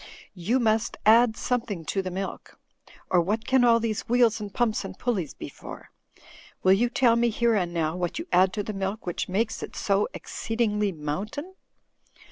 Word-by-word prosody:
You 200 Hz, +8 st, 0 dB
must 225 Hz, -1 st, +1 dB
add 225 Hz, +1 st, +5 dB
something 230 Hz, -9 st, -2 dB
to 195 Hz, -, -1 dB
the 185 Hz, -, -4 dB
milk, 190 Hz, +2 st, -6 dB, 0.5 s
or 180 Hz, -2 st, +5 dB
what 215 Hz, +6 st, -1 dB
can 260 Hz, 0 st, +3 dB
all 230 Hz, -1 st, +5 dB
these 225 Hz, -2 st, -3 dB
wheels 235 Hz, -3 st, +3 dB
and 205 Hz, -1 st, -6 dB
pumps 235 Hz, +1 st, 0 dB
and 190 Hz, -1 st, -8 dB
pulleys 200 Hz, -, -2 dB
be -, -, -7 dB
for? -, -, -11 dB, 0.7 s
Will 185 Hz, -, +6 dB
you 235 Hz, +5 st, +2 dB
tell 240 Hz, -2 st, +3 dB
me, 235 Hz, 0 st, +2 dB
here 235 Hz, +1 st, +1 dB
and 180 Hz, -5 st, 0 dB
now, 165 Hz, -1 st, -1 dB
what 175 Hz, -1 st, -3 dB
you 330 Hz, -, -4 dB
add 185 Hz, +1 st, +4 dB
to 205 Hz, -, -2 dB
the 215 Hz, -, -5 dB
milk 195 Hz, +2 st, -3 dB
which 175 Hz, -, -3 dB
makes 220 Hz, +4 st, -1 dB
it -, -, -7 dB
so 200 Hz, 0 st, +1 dB
exceedingly 210 Hz, -3 st, -1 dB
Moimtain?" 195 Hz, -, -5 dB
215 Hz, 185 wpm, -26 LUFS, 190-235 Hz, 0.7 s, Will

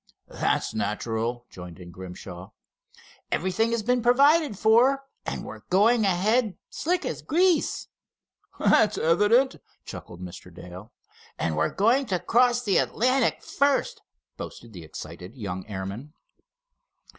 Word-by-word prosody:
"That's -, -, -1 dB
natural," 115 Hz, +1 st, -2 dB
joined 90 Hz, -2 st, -10 dB
in 85 Hz, -1 st, -11 dB
Grimshaw. 90 Hz, 0 st, -9 dB, 0.8 s
"Everything 190 Hz, +6 st, +1 dB
has 230 Hz, -2 st, -1 dB
been 245 Hz, +2 st, +1 dB
provided 280 Hz, -, +4 dB
for, 245 Hz, +6 st, +4 dB, 0.2 s
and -, -, -3 dB
we're -, -, -8 dB
going 215 Hz, +4 st, +4 dB
ahead 205 Hz, +4 st, +1 dB
slick 355 Hz, +3 st, -1 dB
as -, -, -4 dB
grease." 355 Hz, +1 st, +1 dB, 0.7 s
"That's 210 Hz, -1 st, +3 dB
evident," 210 Hz, +11 st, +3 dB, 0.3 s
chuckled 85 Hz, -, -9 dB
Mr. 90 Hz, 0 st, -10 dB
Dale. 90 Hz, +5 st, -11 dB, 0.5 s
"And 80 Hz, -2 st, -1 dB
we're 80 Hz, +1 st, +1 dB
going 240 Hz, +7 st, +2 dB
to 185 Hz, -, 0 dB
cross 245 Hz, +3 st, +3 dB
the 200 Hz, -4 st, +2 dB
Atlantic 255 Hz, +1 st, +1 dB
first!" 285 Hz, -, 0 dB, 0.4 s
boasted 115 Hz, -2 st, -9 dB
the 90 Hz, -, -9 dB
excited 90 Hz, +4 st, -9 dB
young 95 Hz, -6 st, -5 dB
airman. 100 Hz, +8 st, -6 dB
200 Hz, 120 wpm, -26 LUFS, -, 0.8 s, provided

